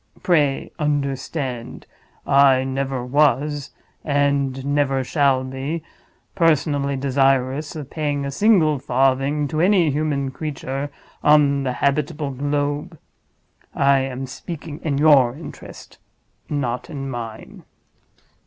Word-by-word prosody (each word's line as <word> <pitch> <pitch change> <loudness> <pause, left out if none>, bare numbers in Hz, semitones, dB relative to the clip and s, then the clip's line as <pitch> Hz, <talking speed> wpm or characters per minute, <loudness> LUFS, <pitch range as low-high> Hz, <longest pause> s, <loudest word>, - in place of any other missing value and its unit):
"Pray 150 -6 +1
understand! 140 -3 -3 0.4
I 135 -1 +5
never 135 -1 -3
was—and 140 -1 0
never 140 -2 +1
shall 135 -1 +2
be—personally 145 +1 -2
desirous 135 +2 +1
of 145 -3 -7
paying 145 -3 -2
a 140 - -3
single 160 -5 +3
farthing 135 +3 +1
to 155 0 -1
any 180 -4 +4
human 140 -2 -1
creature 140 -1 -4 0.3
on 145 -2 +4
the 130 -2 -1
habitable 145 +2 -1
globe. 145 +4 -2 0.8
I 140 0 +4
am 135 0 -3
speaking 155 +3 -8
in 145 -4 -1
your 140 -5 +5
interest, 155 +1 -11 0.5
not 130 -1 -2
in 140 -4 -5
mine." 115 -4 -7
140 Hz, 100 wpm, -21 LUFS, 135-150 Hz, 0.8 s, I